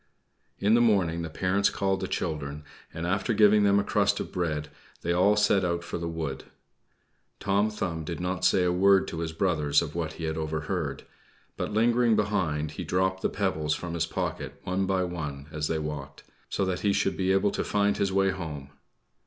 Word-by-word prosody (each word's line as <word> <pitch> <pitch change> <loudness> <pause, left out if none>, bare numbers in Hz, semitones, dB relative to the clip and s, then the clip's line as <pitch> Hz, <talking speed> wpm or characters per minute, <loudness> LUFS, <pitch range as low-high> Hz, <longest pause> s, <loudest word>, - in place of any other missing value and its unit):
In 105 +2 +2
the 120 - +5
morning 95 -8 +2
the 85 - -4
parents 95 +5 +1
called 95 -1 0
the 95 - -3
children, 75 -4 -3 0.3
and, 80 - -5
after 95 +6 0
giving 105 0 +6
them 100 0 +4
a - - +1
crust - - +1
of - - -5
bread, 75 -4 -2 0.3
they 85 - +1
all 95 +4 +4
set 105 -2 +3
out 85 -1 -1
for 85 - -5
the 85 - -3
wood. 80 -5 -4 0.9
Tom 100 +2 +2
Thumb 90 -6 -3
did 85 +2 -5
not 90 0 -2
say 90 0 +4
a 90 - +2
word 95 +2 +4
to 80 - -5
his 85 -1 -2
brothers 80 -4 +2
of 80 -3 -3
what 80 -2 -3
he 85 - -8
had 80 0 -2
overheard; 80 -1 -3 0.5
but, - - -3
lingering 115 +1 +3
behind, 80 -8 0
he 90 - -6
dropped 95 +3 0
the - - +1
pebbles 80 -7 -1
from 85 -1 -5
his 85 -1 0
pocket - - -4
one 95 +1 -1
by 95 -1 +1
one, 75 -6 -5
as 75 0 -2
they 80 - -1
walked, 75 -3 -6 0.3
so 100 - 0
that 95 -1 -1
he 100 -1 +1
should 95 - +1
be 95 0 +1
able 95 +1 +3
to - - -2
find 100 0 +1
his 100 -1 0
way 95 0 +3
home. 75 -7 -6
90 Hz, 200 wpm, -27 LUFS, 80-100 Hz, 0.9 s, giving